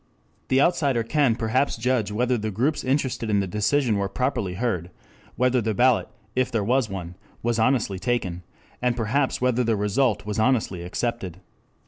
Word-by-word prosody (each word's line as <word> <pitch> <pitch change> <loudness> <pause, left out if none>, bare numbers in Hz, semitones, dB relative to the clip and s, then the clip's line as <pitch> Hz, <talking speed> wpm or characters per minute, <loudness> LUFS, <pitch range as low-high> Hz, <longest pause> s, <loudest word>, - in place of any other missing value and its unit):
The 130 - +3
outsider 140 -7 +2
can 135 -1 +2
perhaps 120 +4 0
judge 115 -2 0
whether 125 +4 +1
the 110 -2 -2
groups 125 +10 0
interested 130 -4 -1
in 105 -1 +3
the 100 - 0
decision 105 +5 +1
were 100 -1 -1
properly 100 -5 -1
heard, 90 -6 -2 0.5
whether 125 0 +2
the 110 -1 -1
ballot, 125 0 +3 0.3
if 130 0 +1
there 115 -3 0
was 125 +1 +1
one, 90 -3 -6 0.3
was 120 0 0
honestly 110 -5 +1
taken, 95 -6 -1 0.4
and 125 -1 +1
perhaps 125 +5 0
whether 125 -1 +2
the 115 -1 +1
result 105 +1 +1
was 105 0 -3
honestly 110 -6 +1
accepted. 95 0 -3
115 Hz, 165 wpm, -24 LUFS, 105-130 Hz, 0.5 s, The